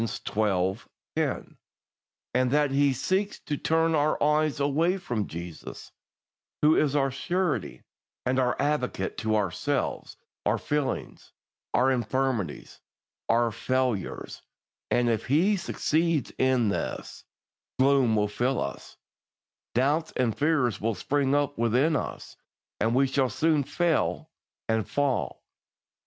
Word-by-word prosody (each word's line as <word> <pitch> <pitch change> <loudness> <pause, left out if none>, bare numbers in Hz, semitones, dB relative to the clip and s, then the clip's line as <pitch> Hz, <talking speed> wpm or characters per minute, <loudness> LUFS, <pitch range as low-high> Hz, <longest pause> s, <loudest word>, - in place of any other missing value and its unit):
10), - - -2 0.8
and 125 0 +2
that 145 +1 +2
he 140 0 +3
seeks 190 +10 -1
to 150 - -3
turn 160 +2 +1
our 150 0 +2
eyes 150 0 +2
away 155 +6 +2
from 120 - -3
Jesus, 85 0 -8 0.7
who 155 +1 +6
is 150 -2 +2
our 135 -2 +2
Surety 175 +4 -2 0.4
and 130 +1 +1
our 125 -1 +2
Advocate, 145 -3 -1
to 110 -1 0
ourselves, 105 +8 -1 0.3
our - - +2
feelings, 145 -3 -3 0.4
our 130 +2 +4
infirmities, 120 - -2 0.5
our 115 0 +3
failures; 125 -2 -2 0.5
and 120 0 +2
if 115 -2 0
he 170 +10 +3
succeeds 165 -3 0
in 130 -4 +3
this, 100 - -4 0.5
gloom 130 -4 +4
will 105 -1 +2
fill 125 +5 0
us, - - -6 0.8
doubts 145 +6 +1
and 120 -4 +1
fears 145 -7 +1
will 115 +1 0
spring 140 +7 +1
up 145 -3 0
within 125 +7 +3
us, 135 - -4 0.4
and 115 +2 +1
we 135 +1 +4
shall 135 -1 +1
soon 155 +1 +2
fail 160 +1 0 0.4
and 110 -1 0
fall. 140 -3 -1
135 Hz, 120 wpm, -27 LUFS, 120-150 Hz, 0.8 s, who